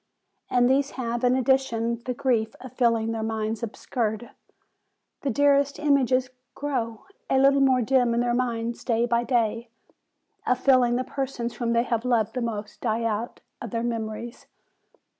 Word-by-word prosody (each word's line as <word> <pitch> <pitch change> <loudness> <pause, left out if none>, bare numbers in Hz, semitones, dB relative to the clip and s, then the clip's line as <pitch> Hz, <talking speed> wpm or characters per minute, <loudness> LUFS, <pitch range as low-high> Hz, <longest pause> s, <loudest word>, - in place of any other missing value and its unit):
And 245 -1 +3
these 270 +2 +2
have, 240 -1 -2
in 250 0 +4
addition, 240 -3 +1
the 250 - -2
grief 230 -4 0
of 260 -2 -10
feeling 230 -3 +1
their 225 -1 -3
minds 220 0 -2
obscured, 230 0 -3 0.9
the 280 - -1
dearest 280 +2 +3
im 295 -2 +3
ages 255 0 +1 0.2
grow.a 265 - -3
little 275 +1 +5
more 260 -2 +4
dim 245 -1 +2
in - - +1
their 240 0 +1
minds 235 -1 -2
day 230 -1 +1
by 235 0 +1
day, 235 -1 0 0.8
of 250 - +3
feeling 255 -2 +4
the 255 - 0
persons 255 -3 -4
whom 235 -1 0
they 235 0 +3
have 235 -2 -1
loved 225 -3 +1
the 250 - -2
most 210 -3 -5
die 230 -1 0
out 225 +1 -3 0.2
of 235 - -5
their 230 +3 -2
memories. 230 0 -4
240 Hz, 160 wpm, -25 LUFS, 230-255 Hz, 0.9 s, little